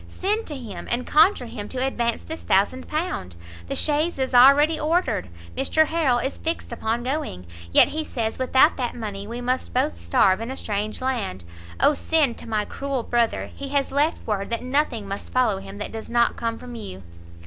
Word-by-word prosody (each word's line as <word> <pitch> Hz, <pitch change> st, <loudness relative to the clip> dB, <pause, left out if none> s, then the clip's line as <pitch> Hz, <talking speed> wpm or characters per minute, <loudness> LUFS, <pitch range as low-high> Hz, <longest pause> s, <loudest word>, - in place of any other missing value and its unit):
send 420 Hz, +4 st, -1 dB
to 300 Hz, -, -4 dB
him, 215 Hz, -8 st, -8 dB
and 245 Hz, +1 st, -1 dB
conjure 305 Hz, -3 st, +4 dB
him 225 Hz, -3 st, -7 dB
to 260 Hz, -, -5 dB
advance 235 Hz, -3 st, -1 dB
this 320 Hz, +1 st, -7 dB
thousand 205 Hz, +7 st, +1 dB
pound! 305 Hz, -, -3 dB, 0.3 s
the -, -, -3 dB
chaise 305 Hz, +2 st, +1 dB
is 265 Hz, -1 st, -1 dB
already 285 Hz, +5 st, +6 dB
ordered, 320 Hz, -, 0 dB, 0.3 s
Mr 315 Hz, -, +3 dB
Harrel 310 Hz, -7 st, +2 dB
is 265 Hz, +3 st, -2 dB
fixed 325 Hz, -4 st, -3 dB
upon 235 Hz, 0 st, -2 dB
going, 255 Hz, -, -3 dB, 0.3 s
yet -, -, +6 dB
he 315 Hz, +1 st, -3 dB
says 230 Hz, -6 st, -3 dB
without 260 Hz, +4 st, +4 dB
that 245 Hz, -3 st, -2 dB
money 205 Hz, -3 st, -5 dB
we 235 Hz, +2 st, -5 dB
must 255 Hz, +1 st, -2 dB
both 270 Hz, +4 st, +1 dB
starve 195 Hz, -6 st, +2 dB
in 230 Hz, -, -4 dB
a 265 Hz, -, -5 dB
strange 210 Hz, +3 st, -3 dB
land, 230 Hz, -, -2 dB, 0.4 s
O 300 Hz, -, +5 dB
send 295 Hz, -5 st, +1 dB
to -, -, -10 dB
my 215 Hz, -2 st, 0 dB
cruel 275 Hz, -1 st, -3 dB
brother! 235 Hz, -1 st, 0 dB
he 280 Hz, -1 st, -6 dB
has 280 Hz, -1 st, 0 dB
left 295 Hz, +4 st, +1 dB
word 200 Hz, -2 st, -2 dB
that 230 Hz, +1 st, -2 dB
nothing 255 Hz, -5 st, 0 dB
must 195 Hz, +1 st, -6 dB
follow 240 Hz, -6 st, +2 dB
him 195 Hz, +1 st, -10 dB
that 205 Hz, -, -5 dB
does 225 Hz, -1 st, -7 dB
not 235 Hz, 0 st, +2 dB
come 230 Hz, -1 st, -2 dB
from 245 Hz, +1 st, -9 dB
you." 95 Hz, -, -8 dB
250 Hz, 195 wpm, -24 LUFS, 220-285 Hz, 0.4 s, already